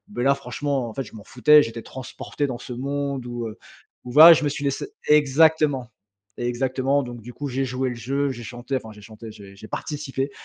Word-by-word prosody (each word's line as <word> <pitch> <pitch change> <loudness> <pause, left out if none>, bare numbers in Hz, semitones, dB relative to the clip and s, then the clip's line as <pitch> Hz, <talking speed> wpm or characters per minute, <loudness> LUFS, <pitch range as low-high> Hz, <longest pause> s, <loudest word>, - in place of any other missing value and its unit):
Mais 120 - -1
là 140 - +5
franchement, 135 -1 -3
en - - -9
fait, 135 - -2
je - - -14
m'en 105 - -10
foutais. 150 +6 +5
J'étais 115 -2 -4
transporté 135 +2 -5
dans 125 -3 -4
ce 125 - -8
monde 140 0 -3
où, 120 -1 -4
heu, 110 - -9 0.5
où 125 - -8
voilà, 160 +5 +10
je 155 - 0
me 145 - +1
suis 145 0 -5
laissé 140 - -2 0.2
exactement. 150 -3 +3 0.5
Exactement, 130 +3 0
donc 120 -2 -8
du 125 +3 -10
coup, 145 +1 -5
j'ai 135 +1 -1
joué 130 +1 -2
le 125 - -5
jeu. 135 +5 -1
J'ai 120 - -8
chanté, 120 +3 -5
enfin 110 -3 -9
j'ai 105 - -15
chanté, 110 +1 -11
j'ai 100 -2 -13
j'ai 110 +2 -12
participé. 140 +1 -4
130 Hz, 220 wpm, -23 LUFS, 120-140 Hz, 0.5 s, voilà